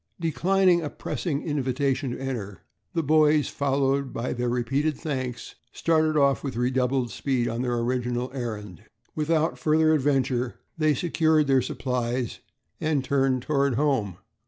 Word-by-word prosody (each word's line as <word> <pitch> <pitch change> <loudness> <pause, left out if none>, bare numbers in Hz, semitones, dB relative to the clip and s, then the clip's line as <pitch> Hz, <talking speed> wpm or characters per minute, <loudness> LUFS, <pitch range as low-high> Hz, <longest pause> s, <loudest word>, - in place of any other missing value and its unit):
Declining 175 +4 +2
a 150 - -3
pressing 150 -2 -3
invitation 140 -2 -1
to 120 - -5
enter, 105 -9 -5 0.3
the 165 - +1
boys, 155 0 +4
followed 140 -1 0
by 120 +2 -3
their 120 0 -1
repeated 135 +5 0
thanks, 130 -6 -4 0.2
started 155 -1 +1
off 140 -1 +3
with 135 -4 -4
redoubled 125 0 0
speed 130 -4 -1
on 115 +1 -2
their 120 -1 -1
original 125 +1 -1
errand. 105 - -6 0.3
Without 160 +1 0
further 155 0 +3
adventure 130 -4 +1 0.2
they 155 -2 +2
secured 160 0 +2
their 135 -2 +3
supplies 125 -1 -2 0.4
and 155 -4 0
turned 135 -2 +1
toward 140 -3 +1
home. 130 - 0
135 Hz, 135 wpm, -26 LUFS, 125-150 Hz, 0.4 s, boys